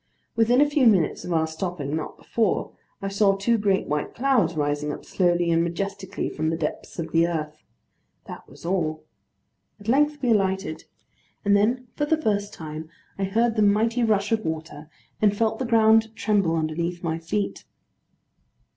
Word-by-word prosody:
Within 230 +3 +4
a 295 - +5
few 285 -3 +3
minutes 190 -7 +3
of 180 - -5
our 160 -1 +2
stopping, 160 -3 -4
not 160 - -5
before, 225 -4 -1 0.3
I - - -1
saw 195 0 +3
two 225 +4 +1
great 200 -2 +1
white 150 0 -3
clouds 240 -10 +2
rising 145 0 -1
up - - -8
slowly 175 -2 +1
and 165 0 +3
majestically 195 +3 -3
from 155 +1 -2
the 165 - -1
depths 155 -2 -4
of 165 -2 -4
the 165 +1 +3
earth. 155 -2 -4 0.6
That - - -10
was - - -14
all. 160 -4 -1 0.8
At 205 - -14
length 295 +4 +2
we 245 - +3
alighted: 190 -5 0 0.6
and 200 0 +4
then 240 +5 +1
for 295 - 0
the 315 +1 +2
first 205 -6 0
time, 155 -4 -8 0.3
I 195 - +1
heard 225 +4 +1
the 215 - +2
mighty 225 +4 +3
rush 210 -2 +1
of 220 -1 +1
water, 160 -2 -5 0.3
and 205 -1 +3
felt 225 0 0
the 260 - -1
ground 225 -1 +4
tremble 200 -6 +1
underneath 170 +2 -2
my 165 -1 -1
feet. 195 +5 -3
195 Hz, 175 wpm, -24 LUFS, 165-220 Hz, 0.8 s, a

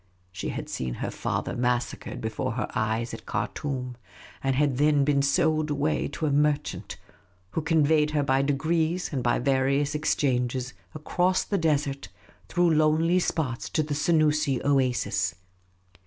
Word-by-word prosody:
She 90 -1 -4
had - - -5
seen 65 -2 -4
her - - -4
father - - -3
massacred 125 0 -2
before 110 0 -2
her 110 -2 -2
eyes 110 +2 -1
at - - -9
Khartoum, 125 0 -3 0.5
and 135 -1 +1
had 140 -2 +1
then 145 -1 +4
been 140 -1 +3
sold 155 +2 +2
away 145 +1 0
to 160 - -4
a 150 - +1
merchant, 145 +1 0 0.5
who 160 - -1
conveyed 155 -1 +3
her 150 -1 +1
by 135 -1 +2
degrees 160 +5 0
and 135 - -1
by 120 0 +2
various 135 +2 +1
ex 150 0 +1
changes 125 -2 -1 0.2
across 180 +4 +1
the 200 - -1
desert 145 -4 0 0.4
through 175 -1 +3
lonely 155 +3 +3
spots 145 -8 -2
to 155 - 0
the 150 0 -3
Senoosi 150 -3 +2
oasis. 130 -3 +1
145 Hz, 150 wpm, -26 LUFS, 130-155 Hz, 0.5 s, then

